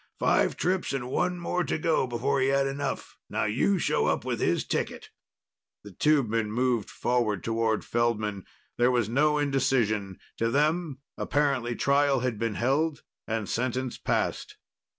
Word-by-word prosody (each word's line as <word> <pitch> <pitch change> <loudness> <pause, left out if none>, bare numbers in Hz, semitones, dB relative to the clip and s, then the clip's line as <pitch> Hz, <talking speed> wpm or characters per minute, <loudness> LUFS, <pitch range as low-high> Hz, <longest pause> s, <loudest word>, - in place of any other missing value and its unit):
Five - - +2
trips 185 -4 0
and 125 -2 -3
one 180 +4 0
more 175 +1 -1
to - - -1
go 155 -4 +1
before 130 +3 0
he 130 - +3
had 135 0 +2
enough. 135 +1 -4
Now - - -1
you 130 - +2
show - - +1
up - - 0
with - - -2
his - - +1
ticket!" - - -3 0.7
The 105 - -10
tubemen 115 - +1
moved 120 -1 0
forward 115 -6 0
toward 115 -1 0
Feldman. 110 -4 -1 0.3
There 120 +1 +4
was 120 -4 +1
no 150 +6 +2
indecision. 120 -9 +1 0.2
To 115 - +1
them, 150 +2 +1 0.2
apparently, 135 -5 0
trial 140 -1 +2
had 125 -4 -2
been 115 -2 -1
held 140 - 0 0.2
and 110 -2 -2
sentence 130 +2 -2
passed. - - -2
130 Hz, 150 wpm, -27 LUFS, 115-145 Hz, 0.7 s, There